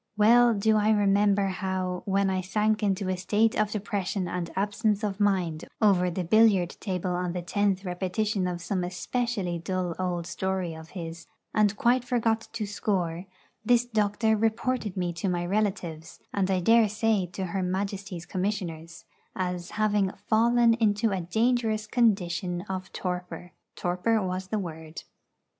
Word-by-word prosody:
Well 235 Hz, +2 st, +6 dB
do 215 Hz, +2 st, +3 dB
I 210 Hz, 0 st, +2 dB
remember 205 Hz, -1 st, +3 dB
how, 185 Hz, -1 st, -2 dB
when 195 Hz, 0 st, +2 dB
I 185 Hz, 0 st, 0 dB
sank 210 Hz, +3 st, 0 dB
into 195 Hz, -2 st, 0 dB
a 185 Hz, -, 0 dB
state 210 Hz, +4 st, +2 dB
of 215 Hz, -1 st, +1 dB
depression 200 Hz, -3 st, -2 dB
and 175 Hz, -1 st, -3 dB
absence 205 Hz, +2 st, 0 dB
of 205 Hz, -1 st, -2 dB
mind 185 Hz, -6 st, +1 dB
over 185 Hz, -4 st, +4 dB
the 180 Hz, +1 st, -3 dB
billiard 195 Hz, -2 st, +4 dB
table 185 Hz, -3 st, -2 dB
on 180 Hz, -1 st, -2 dB
the 180 Hz, -1 st, -4 dB
tenth 195 Hz, +2 st, 0 dB
repetition 185 Hz, +2 st, -1 dB
of 175 Hz, -1 st, -4 dB
some 185 Hz, -2 st, -1 dB
especially 185 Hz, -1 st, -2 dB
dull 180 Hz, 0 st, -2 dB
old 175 Hz, -2 st, -2 dB
story 185 Hz, 0 st, -2 dB
of 160 Hz, 0 st, -11 dB
his, 165 Hz, -1 st, -7 dB, 0.3 s
and 210 Hz, -1 st, +2 dB
quite 245 Hz, +3 st, +3 dB
forgot 225 Hz, -2 st, 0 dB
to 230 Hz, -2 st, -3 dB
score, 185 Hz, -4 st, -2 dB, 0.4 s
this 240 Hz, +1 st, +3 dB
doctor 220 Hz, -1 st, +1 dB
reported 225 Hz, -1 st, -1 dB
me 175 Hz, -1 st, -1 dB
to 170 Hz, +3 st, -2 dB
my 175 Hz, -1 st, -1 dB
relatives, 180 Hz, -5 st, -2 dB
and 195 Hz, -2 st, 0 dB
I 185 Hz, -1 st, +1 dB
dare 225 Hz, +3 st, +5 dB
say 215 Hz, -3 st, +1 dB
to 190 Hz, -, -3 dB
her 195 Hz, -, 0 dB
Majesty's 190 Hz, -1 st, -3 dB
Commissioners, 175 Hz, -4 st, -4 dB, 0.3 s
as 180 Hz, -1 st, -3 dB
having 210 Hz, -2 st, +1 dB, 0.2 s
'fallen 235 Hz, +1 st, +4 dB
into 220 Hz, -1 st, +1 dB
a 190 Hz, -2 st, -1 dB
dangerous 220 Hz, +3 st, +1 dB
condition 190 Hz, -6 st, +1 dB
of 190 Hz, -2 st, -5 dB
torpor.' 180 Hz, -1 st, -5 dB, 0.2 s
Torpor 180 Hz, +6 st, 0 dB
was 185 Hz, 0 st, -3 dB
the 215 Hz, -, -2 dB
word. 160 Hz, -4 st, -6 dB
195 Hz, 155 wpm, -27 LUFS, 180-215 Hz, 0.4 s, Well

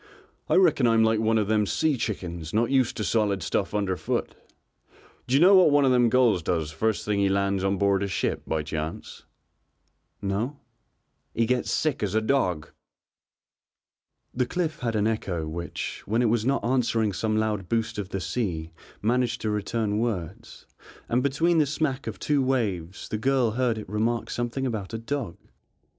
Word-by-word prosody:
I -, -, +3 dB
reckon 165 Hz, -9 st, +4 dB
I'm 115 Hz, -1 st, +4 dB
like 110 Hz, -1 st, +2 dB
one 110 Hz, 0 st, +2 dB
of 105 Hz, -2 st, +1 dB
them 105 Hz, -1 st, +2 dB
sea 155 Hz, +5 st, +1 dB
chickens 85 Hz, -7 st, -4 dB
not 115 Hz, +3 st, +2 dB
used 130 Hz, -2 st, +2 dB
to 105 Hz, -, -2 dB
solid 100 Hz, -2 st, +1 dB
stuff -, -, -1 dB
underfoot. 95 Hz, -6 st, -1 dB, 0.9 s
D'you 130 Hz, +3 st, +3 dB
know 185 Hz, +5 st, +7 dB
what 185 Hz, -4 st, +7 dB
one 145 Hz, -1 st, +4 dB
of 130 Hz, -, +4 dB
them 125 Hz, -2 st, +4 dB
gulls 120 Hz, -7 st, +3 dB
does 80 Hz, -2 st, -1 dB
first 110 Hz, +7 st, -1 dB
thing 105 Hz, -1 st, 0 dB
he 100 Hz, -1 st, +3 dB
lands 100 Hz, 0 st, 0 dB
on 95 Hz, 0 st, +1 dB
board 100 Hz, 0 st, +2 dB
a 100 Hz, -, 0 dB
ship 95 Hz, -, -1 dB
by 80 Hz, -1 st, -1 dB
chance?" 80 Hz, +1 st, -6 dB, 0.9 s
"No." 105 Hz, +9 st, -2 dB, 0.8 s
"He 115 Hz, -, +2 dB
gets 125 Hz, +1 st, 0 dB
sick 155 Hz, -4 st, 0 dB
as 105 Hz, -1 st, -1 dB
a -, -, +5 dB
dog." 95 Hz, -, 0 dB, 1.6 s
The 125 Hz, 0 st, 0 dB
cliff 165 Hz, -4 st, -2 dB
had 115 Hz, -2 st, -2 dB
an 105 Hz, -1 st, +1 dB
echo 95 Hz, -7 st, -2 dB
which, 85 Hz, +2 st, -5 dB
when 115 Hz, +4 st, +1 dB
it 115 Hz, -, +3 dB
was 115 Hz, 0 st, +1 dB
not 140 Hz, -2 st, +1 dB
answering 115 Hz, -4 st, +1 dB
some 110 Hz, +3 st, -1 dB
loud 105 Hz, -4 st, -1 dB
boost 115 Hz, -1 st, -1 dB
of 95 Hz, -2 st, -4 dB
the 95 Hz, -, -3 dB
sea 85 Hz, -7 st, -3 dB, 0.3 s
managed 120 Hz, +2 st, +1 dB
to 110 Hz, -, -1 dB
return 105 Hz, 0 st, -1 dB
words, 100 Hz, -7 st, -4 dB, 0.4 s
and 120 Hz, +2 st, +2 dB
between 160 Hz, +5 st, +2 dB
the 150 Hz, -, +3 dB
smack 140 Hz, -2 st, -2 dB
of -, -, -4 dB
two 145 Hz, -2 st, +1 dB
waves 100 Hz, -9 st, -2 dB
the 110 Hz, -, -3 dB
girl 130 Hz, -2 st, +2 dB
heard 120 Hz, 0 st, 0 dB
it 110 Hz, -, -7 dB
remark 110 Hz, +4 st, -1 dB
something 120 Hz, +3 st, -2 dB
about 110 Hz, -4 st, -3 dB
a -, -, -1 dB
dog. 115 Hz, -4 st, -4 dB
110 Hz, 180 wpm, -26 LUFS, 100-125 Hz, 1.6 s, know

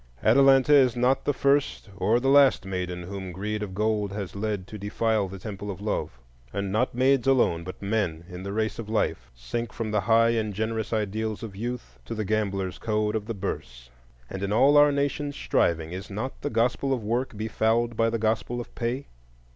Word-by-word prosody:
Atalanta 135 Hz, +4 st, +5 dB
is 130 Hz, -4 st, +5 dB
not 125 Hz, +2 st, +2 dB
the -, -, +3 dB
first 140 Hz, -5 st, +1 dB
or 110 Hz, +5 st, +2 dB
the 130 Hz, -, -1 dB
last 140 Hz, -6 st, +5 dB
maiden 90 Hz, -2 st, -4 dB
whom 95 Hz, 0 st, -6 dB
greed 105 Hz, +4 st, -3 dB
of 95 Hz, -3 st, -5 dB
gold 105 Hz, -1 st, 0 dB
has 100 Hz, -2 st, -5 dB
led 100 Hz, -2 st, -2 dB
to 105 Hz, +2 st, -9 dB
defile 105 Hz, 0 st, 0 dB
the 95 Hz, +1 st, -8 dB
temple 100 Hz, +1 st, -7 dB
of 95 Hz, -1 st, -5 dB
Love; 100 Hz, -, -3 dB, 0.3 s
and 100 Hz, +3 st, -3 dB
not 115 Hz, +4 st, 0 dB
maids 130 Hz, 0 st, +3 dB
alone, 120 Hz, -11 st, +3 dB
but 95 Hz, +1 st, -8 dB
men 100 Hz, -6 st, -1 dB
in 90 Hz, -1 st, -8 dB
the 100 Hz, +1 st, -5 dB
race 110 Hz, 0 st, -1 dB
of 110 Hz, -2 st, -6 dB
life, 110 Hz, -, -1 dB
sink 115 Hz, -, -4 dB
from 115 Hz, -2 st, -4 dB
the 105 Hz, -1 st, +1 dB
high 115 Hz, +3 st, +4 dB
and 110 Hz, -3 st, -1 dB
generous 110 Hz, +1 st, -2 dB
ideals 110 Hz, 0 st, -2 dB
of 105 Hz, -4 st, -7 dB
youth 115 Hz, -, -6 dB
to -, -, -5 dB
the 110 Hz, -1 st, -2 dB
gambler's 100 Hz, -3 st, -1 dB
code 105 Hz, -1 st, 0 dB
of 105 Hz, -1 st, -3 dB
the 115 Hz, -, -3 dB
Bourse; 60 Hz, -11 st, -6 dB, 0.4 s
and 95 Hz, -, -6 dB
in 100 Hz, 0 st, -2 dB
all 135 Hz, +7 st, +5 dB
our 145 Hz, 0 st, +7 dB
Nation's 145 Hz, 0 st, -1 dB
striving 80 Hz, -1 st, 0 dB
is 95 Hz, +2 st, -6 dB
not 110 Hz, +6 st, -5 dB
the 145 Hz, -, -2 dB
Gospel 125 Hz, +3 st, +1 dB
of 120 Hz, -4 st, -2 dB
Work 120 Hz, +1 st, -2 dB
befouled 110 Hz, +2 st, 0 dB
by 115 Hz, 0 st, +2 dB
the 115 Hz, -, -1 dB
Gospel 115 Hz, +2 st, -1 dB
of 120 Hz, -, -8 dB
Pay? 125 Hz, +3 st, -2 dB
110 Hz, 200 wpm, -26 LUFS, 100-120 Hz, 0.4 s, our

